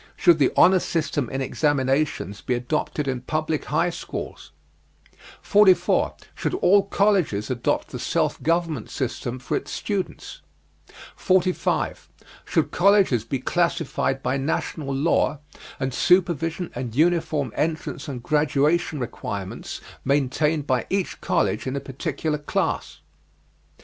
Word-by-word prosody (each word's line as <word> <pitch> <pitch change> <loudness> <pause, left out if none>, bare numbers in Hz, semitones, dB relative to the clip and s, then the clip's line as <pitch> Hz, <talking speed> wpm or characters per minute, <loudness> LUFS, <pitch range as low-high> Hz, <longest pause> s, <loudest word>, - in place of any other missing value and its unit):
Should 170 -3 +5
the 135 - +4
honor 185 +1 +7
system 155 -7 -1
in 135 0 -3
examinations 135 -6 0
be 125 - -1
adopted 145 +3 -2
in 130 -2 -2
public 155 +3 -2
high 175 - +1
schools? 175 - -7 0.9
44. 205 -3 +4 0.2
Should - - -2
all 200 - +5
colleges 185 - +1
adopt 120 -2 -1
the - - -6
self - - 0
government 165 -7 0
system 125 -1 -3
for 125 - -3
its - - -3
students? 200 -3 -4 0.7
45. 185 -1 0 0.4
Should - - 0
colleges 190 - +4
be 125 +4 -2
classified 140 -3 0
by 130 +2 0
national 140 +1 -2
law 145 +2 +1 0.4
and 130 -1 -2
supervision, 170 +1 +2
and 120 -2 -5
uniform 155 -5 +1
entrance 155 -3 -2
and 125 -4 -6
graduation 150 +3 +1
requirements 100 -5 -5 0.2
maintained 145 +2 +1
by 130 -4 0
each 195 -1 -2
college - - 0
in 130 - -2
a - - -1
particular 145 +3 -3
class? 145 - -2
150 Hz, 120 wpm, -24 LUFS, 130-170 Hz, 0.9 s, honor